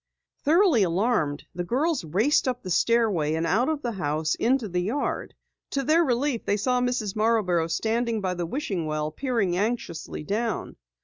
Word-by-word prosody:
Thoroughly 325 - +4
alarmed, 175 -5 +1
the 175 - -3
girls 275 - 0
raced 215 - +2
up 250 -1 -2
the 185 - -5
stairway 190 -7 +2
and 165 +1 -1
out 220 - +2
of 310 -2 -2
the 240 - -1
house 155 -5 -1
into 245 -1 +1
the 180 -2 -1
yard. 235 +10 -2 0.4
To 275 - 0
their 320 +5 +4
relief 260 -2 0
they 205 - 0
saw 250 +4 +1
Mrs. 245 -5 -1
Marborough 210 -7 +2
standing 225 +6 0
by 185 -2 -1
the 175 -1 -3
wishing 190 - -3
well, 155 0 -2
peering 230 - -1
anxiously 200 -7 -3
down. 215 +5 -2
220 Hz, 170 wpm, -26 LUFS, 175-250 Hz, 0.4 s, Thoroughly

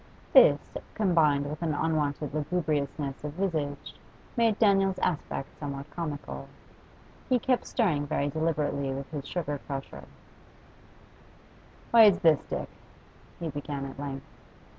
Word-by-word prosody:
This, - - +8 0.4
combined 160 -8 +3
with 150 +2 -6
an 160 -3 0
unwonted 150 -2 -1
lugubriousness 150 -3 -2
of 150 -1 -4
visage, 155 -6 -2 0.4
made 230 -4 +3
Daniel's 195 -3 +3
aspect 155 -6 -2
somewhat 140 0 -6
comical. 145 - -5 0.8
He 255 - +4
kept 250 +1 0
stirring 160 - +1
very 140 - 0
deliberately 145 -2 -1
with 135 +2 -6
his 145 -3 -5
sugar 150 -5 -3
crusher. 135 -1 -6 1.9
'Why, 230 -1 +9
it's 200 -3 +6
this, 165 -6 +4
Dick,' - - -3 0.7
he 170 -2 -3
began 145 -1 -4
at 135 0 -8
length. 135 -1 -5
150 Hz, 120 wpm, -28 LUFS, 140-180 Hz, 1.9 s, Why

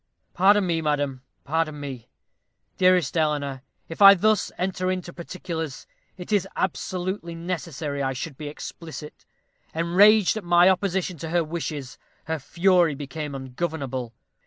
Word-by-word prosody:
Pardon 200 +2 +4
me, 165 -2 0
madam, 145 -4 -1 0.2
pardon 155 0 -1
me, 135 -5 -7 0.7
dearest 180 -5 +3
Eleanor, 145 -4 0 0.3
if 165 - -8
I 200 0 +11
thus 215 +2 +2
enter 185 0 -1
into 180 -2 -3
particulars; 165 -4 -6 0.3
it 180 +3 -9
is 205 -4 +2
absolutely 185 -1 -3
necessary 165 -4 -4
I 135 -1 0
should 140 +3 -5
be 150 +2 -7
explicit. 150 0 -9 0.5
Enraged 195 +6 +5
at 215 - -5
my 175 +1 +5
opposition 185 -2 0
to 160 - -5
her 170 0 +2
wishes, 150 -4 -5 0.3
her 160 0 -2
fury 175 +1 +3
became 145 +1 -6
ungovernable. 130 -3 -4
165 Hz, 135 wpm, -25 LUFS, 145-180 Hz, 0.7 s, I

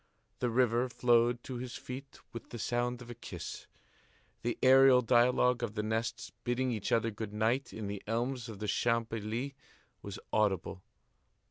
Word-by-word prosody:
The 125 - +1
river 120 +1 +2
flowed 120 0 +3
to 130 - -5
his 125 0 -6
feet 135 +2 -8 0.2
with 115 - -8
the 120 - -6
sound 120 +2 -1
of 120 - -10
a - - -5
kiss. 120 - -8 0.7
The 120 0 -1
aerial 130 -1 +7
dialogue 125 +1 +4
of 115 -3 -3
the 105 - -1
nests 110 +1 -2
bidding 125 +1 0
each 110 -4 -3
other 115 0 +2
good 105 0 -6
night 115 +6 +1
in 110 - -6
the 100 -1 -4
elms 120 +2 -2
of 110 - -7
the 105 +1 -4
Champs 115 +2 +1
Élysées 115 +5 -3 0.5
was - - -7 0.2
audible. 95 -3 +1
120 Hz, 165 wpm, -32 LUFS, 110-125 Hz, 0.7 s, aerial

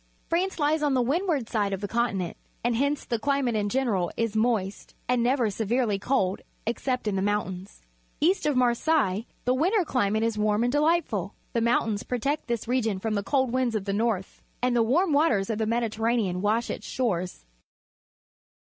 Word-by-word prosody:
France 365 +3 0
lies 305 0 +1
on 290 -3 +2
the 255 - +3
windward 300 - 0
side 205 -4 0
of 195 - -2
the 205 - -3
continent, 200 -6 -1 0.3
and 240 0 +1
hence 280 +4 0
the 235 - -1
c - - -1
lima 275 -3 +2
te^ - - -3
in 205 -1 0
general, 215 -8 0
is 230 -2 0
moist^, 220 -3 -1
and 250 -1 +2
ne 245 +3 +3
ver 235 -6 0
severely 220 0 0
cold, 200 -4 0 0.2
except 250 +1 -2
in 205 - 0
the 190 - 0
mountains. 195 - -3 0.4
East 345 +1 +2
of 295 - +1
^larseilles 245 -3 +2 0.2
the 250 - +3
winter 360 - +2
climate 220 -6 +1
is 225 -2 0
warm 210 +1 +2
and 245 - +1
delightful. 290 - +1 0.2
The 230 - +1
mountains 225 -2 +1
protect 275 +5 -2
this 235 -2 -2
region 230 -5 0
from 215 +3 -2
the 200 - 0
cold 260 +3 +1
winds 250 -2 0
of 205 -3 -2
the 200 - -1
north, 210 -3 -1 0.2
and 250 0 +1
the 235 - +4
warm 300 +9 +2
waters 235 -9 +2
of 215 - -3
the 220 - 0
Mediterranean 225 -4 0
wash 220 +3 +1
its - - -6
shores. 180 - -2
235 Hz, 190 wpm, -26 LUFS, 205-260 Hz, 0.4 s, the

